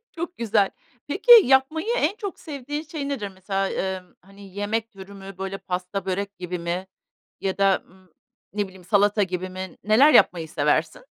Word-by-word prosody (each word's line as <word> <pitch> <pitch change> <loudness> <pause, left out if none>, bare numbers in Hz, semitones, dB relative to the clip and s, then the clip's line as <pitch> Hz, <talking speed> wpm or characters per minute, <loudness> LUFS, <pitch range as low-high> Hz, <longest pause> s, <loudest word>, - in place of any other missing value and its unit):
Çok 340 +2 -6
güzel. 215 -4 +2 0.4
Peki, 405 +11 +5
yapmayı 265 - +2
en 390 0 +1
çok 405 -4 -6
sevdiğin 290 -1 -5
şey 300 -2 -5
nedir? 235 -8 -3
Mesela, 195 +1 -3
emm, 185 -1 -4
hani, 195 0 -15
yemek 220 +3 -2
türü 195 -1 -12
mü, 195 -1 -10
böyle, 195 0 -4
pasta, 180 +1 -4
börek 200 +2 -3
gibi 180 0 -4
mi 175 +2 -3 0.5
ya 190 0 -2
da, 195 -1 +3
ımm, 185 -1 -23 0.4
ne 205 0 -1
bileyim, 185 -1 -15
salata 205 +1 +3
gibi 185 0 -2
mi, 185 0 -7
neler 255 +8 +6
yapmayı 165 -8 +4
seversin? - - 0
200 Hz, 165 wpm, -24 LUFS, 185-265 Hz, 0.5 s, neler